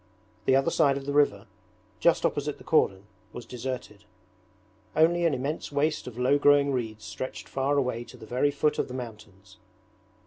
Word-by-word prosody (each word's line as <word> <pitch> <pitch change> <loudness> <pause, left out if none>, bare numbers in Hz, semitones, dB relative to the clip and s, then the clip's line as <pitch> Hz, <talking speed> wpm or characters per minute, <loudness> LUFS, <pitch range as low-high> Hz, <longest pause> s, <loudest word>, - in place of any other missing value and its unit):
The 130 - +4
other 135 +5 +2
side 140 -4 +3
of 135 - -7
the 140 - -2
river, 145 0 +2 0.5
just - - +3
opposite - - -1
the - - -14
cordon, 95 0 +2 0.3
was 120 - -8
deserted; 125 -4 -6 0.9
only 170 +2 +4
an 150 - +1
immense 140 +5 -4
waste 145 +1 0
of 120 -2 -8
low 130 +3 +3
growing 145 -1 +5
reeds 110 -4 -3
stretched 130 - -6
far 135 +2 0
away 125 -4 0
to - - -13
the - - -11
very 125 +5 +1
foot 145 +1 0
of - - 0
the 125 - -7
mountains. 105 -5 -10
130 Hz, 175 wpm, -27 LUFS, 115-145 Hz, 0.9 s, growing